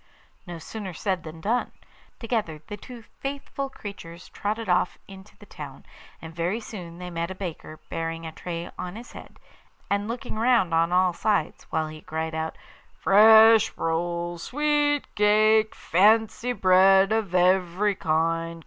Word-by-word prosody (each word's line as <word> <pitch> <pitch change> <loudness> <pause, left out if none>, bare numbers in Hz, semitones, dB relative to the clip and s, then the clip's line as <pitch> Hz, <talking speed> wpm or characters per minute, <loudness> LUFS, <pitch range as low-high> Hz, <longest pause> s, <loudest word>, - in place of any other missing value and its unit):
No 175 -1 -6
sooner 190 +3 -7
said 185 +1 -2
than 160 0 -10
done. 230 +7 -1 0.5
Together 220 - -3
the 205 - -7
two 235 +3 -12 0.2
faithful 275 0 -5
creatures 180 -7 -10
trotted 215 +2 -4
off 180 0 +1
into 195 +1 -14
the 205 - -15
town, 140 -7 -10 0.3
and 160 0 -10
very 175 +7 -1
soon 180 -7 -9
they 180 0 -7
met 170 0 -3
a 190 - -6
baker 170 -4 -7
bearing 165 0 -4
a 160 - -6
tray 170 +1 -6
on 180 +1 -5
his 235 +2 -10
head, - - -13 0.5
and 200 +1 0
looking 230 -1 -5
round 230 -7 +3
on 165 +1 +2
all 180 0 +3
sides, 200 -4 -1
while 160 -1 -1
he 155 0 -10
cried: 160 0 -4 0.6
'Fresh 220 +2 +6
rolls, 170 +1 -2
sweet 295 0 +1
cake, 215 +1 +3
Fancy 220 +6 +2
bread 190 -1 +5
of 215 -5 -1
every 185 +2 +2
kind. 165 0 -1
190 Hz, 150 wpm, -25 LUFS, 165-220 Hz, 0.6 s, Fresh